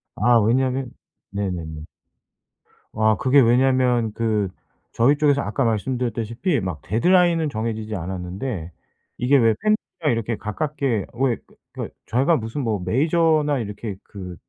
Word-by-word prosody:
아 120 Hz, -1 st, +4 dB
왜냐면 130 Hz, +3 st, +1 dB, 0.4 s
네네네. 85 Hz, -6 st, -4 dB, 1.1 s
아 110 Hz, 0 st, +3 dB
그게 135 Hz, +5 st, +4 dB
왜냐면 125 Hz, -2 st, +3 dB
그 105 Hz, -4 st, 0 dB, 0.4 s
저희 135 Hz, +5 st, +3 dB
쪽에서 145 Hz, -2 st, +3 dB
아까 135 Hz, -, -1 dB
말씀드렸다시피 120 Hz, -, -1 dB
막 90 Hz, -5 st, -4 dB
데드라인은 170 Hz, -, +3 dB
정해지지 110 Hz, -2 st, -3 dB
않았는데 90 Hz, +1 st, -5 dB, 0.5 s
이게 135 Hz, +3 st, +3 dB
왜 115 Hz, -3 st, +4 dB
팬이랑 215 Hz, -, 0 dB
이렇게 115 Hz, 0 st, -2 dB
가깝게 130 Hz, -, -2 dB
왜 125 Hz, -1 st, +1 dB
그 -, -, -23 dB, 0.2 s
그 -, -, -4 dB, 0.2 s
저희가 135 Hz, +7 st, +2 dB
무슨 115 Hz, +5 st, -4 dB
뭐 110 Hz, -5 st, -1 dB
메이저나 155 Hz, -, +2 dB
이렇게 105 Hz, -2 st, -5 dB
그 90 Hz, -4 st, -9 dB
115 Hz, 295 characters per minute, -22 LUFS, 105-135 Hz, 1.1 s, 아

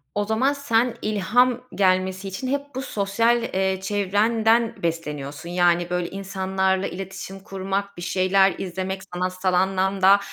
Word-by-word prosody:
O 205 Hz, -, 0 dB
zaman 235 Hz, +7 st, +2 dB
sen 245 Hz, -4 st, +1 dB
ilham 235 Hz, +4 st, +2 dB
gelmesi 190 Hz, 0 st, +1 dB
için 195 Hz, +7 st, -5 dB
hep 280 Hz, +2 st, 0 dB
bu 260 Hz, -, -2 dB
sosyal, 230 Hz, +2 st, +1 dB
eee, 190 Hz, -3 st, 0 dB
çevrenden 220 Hz, +4 st, +1 dB
besleniyorsun. 150 Hz, -1 st, -4 dB
Yani, 175 Hz, -1 st, +2 dB
böyle, 180 Hz, -1 st, -1 dB
insanlarla 190 Hz, 0 st, -1 dB
iletişim 195 Hz, +1 st, -7 dB
kurmak, 195 Hz, 0 st, -4 dB
bir -, -, -7 dB
şeyler 190 Hz, +2 st, +3 dB
izlemek, 190 Hz, +1 st, -4 dB
sanatsal 185 Hz, +1 st, -1 dB
anlamda 190 Hz, +1 st, +3 dB
190 Hz, 130 wpm, -23 LUFS, 185-210 Hz, -, şeyler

